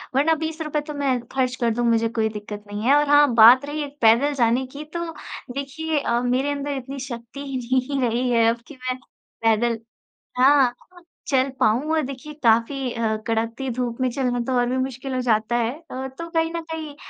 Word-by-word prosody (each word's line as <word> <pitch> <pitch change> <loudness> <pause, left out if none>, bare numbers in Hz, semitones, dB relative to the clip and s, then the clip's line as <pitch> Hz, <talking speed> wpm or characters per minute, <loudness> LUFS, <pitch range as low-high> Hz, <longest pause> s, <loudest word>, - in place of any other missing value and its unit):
वरना 295 +4 +4
₹20 315 -1 -3
तो 300 - -5
मैं 275 -3 0
खर्च 255 -1 0
कर 235 - +3
दूँ, 240 +1 -1
मुझे 230 0 +2
कोई 220 -1 0
दिक्कत 210 -1 -7
नहीं 205 +1 -5
है। 280 - +6
और 295 0 +3
हाँ, 290 -3 +5
बात 240 +5 +8
रही 295 +1 -3
एक 290 0 -9
पैदल 235 +6 +5
जाने 250 0 +2
की, 295 - -6
तो 335 +2 -5 0.4
देखिए 295 +3 -2
अ, 235 -3 0
मेरे 255 +3 0
अंदर 285 0 -3
इतनी 265 +2 -7
शक्ति 240 0 -7
ही 270 -1 -3
नहीं 255 +2 -1
रही 245 +2 0
है 230 -1 +4
अब 235 0 -2
कि 300 - -11
मैं 255 0 -4 0.5
पैदल 225 +1 +2 0.6
हाँ, 265 -1 +5 0.6
चल 265 -1 +2
पाऊँ, 250 +6 +2
और 315 - +2
देखिए, 275 +3 -7
काफ़ी 240 +3 +2
अ, 225 -2 0
कड़कती 230 +4 -1
धूप 240 -1 -3
में 255 - +2
चलना 250 -1 -1
तो 260 - -1
और 245 - +2
भी 255 - -1
मुश्किल 260 0 -3
हो 255 - -1
जाता 225 -1 +1
है। 235 0 +1 0.2
अ, 265 +1 -4
तो 335 0 -6
कहीं 325 -1 0
न 335 - -2
कहीं 310 -3 -5
255 Hz, 205 wpm, -23 LUFS, 235-285 Hz, 0.6 s, बात